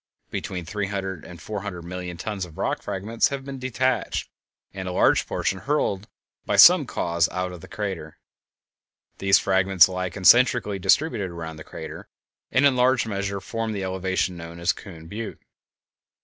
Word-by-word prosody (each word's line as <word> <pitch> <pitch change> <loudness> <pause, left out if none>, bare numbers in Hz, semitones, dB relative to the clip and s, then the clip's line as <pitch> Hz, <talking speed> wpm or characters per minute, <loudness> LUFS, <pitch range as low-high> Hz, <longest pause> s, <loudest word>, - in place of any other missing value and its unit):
Between 90 -2 -4
three 100 +4 -3
hundred 95 -4 -4
and 90 -2 -11
four 105 +4 -5
hundred 90 -4 -6
million 90 0 -6
tons 100 +2 -4
of 80 -3 -9
rock - - -1
fragments 110 +4 0
have 140 -1 -5
been 135 -1 -6
detached, 130 -1 -1 0.4
and 95 -1 -5
a - - -2
large - - +3
portion 95 - -1
hurled 105 -6 -1 0.4
by - - -1
some - - +8
cause 85 -1 0
out 90 0 -3
of 90 -2 -10
the - - -11
crater. 95 -7 -5 1.0
These 95 -1 +5
fragments 95 -3 +4
lie 90 0 -3
concentrically 100 +2 +4
distributed 105 - +2
around 80 -2 -7
the 80 - -9
crater, - - -9 0.4
and 130 +3 +4
in 140 -2 +5
large 125 -2 +3
measure 100 -2 -3
form 115 +2 -3
the 100 -2 -3
elevation 95 -1 -1
known 85 0 -9
as 85 +1 +2
Coon 85 -6 -11
Butte. 105 +6 -6
95 Hz, 165 wpm, -24 LUFS, 90-110 Hz, 1.0 s, some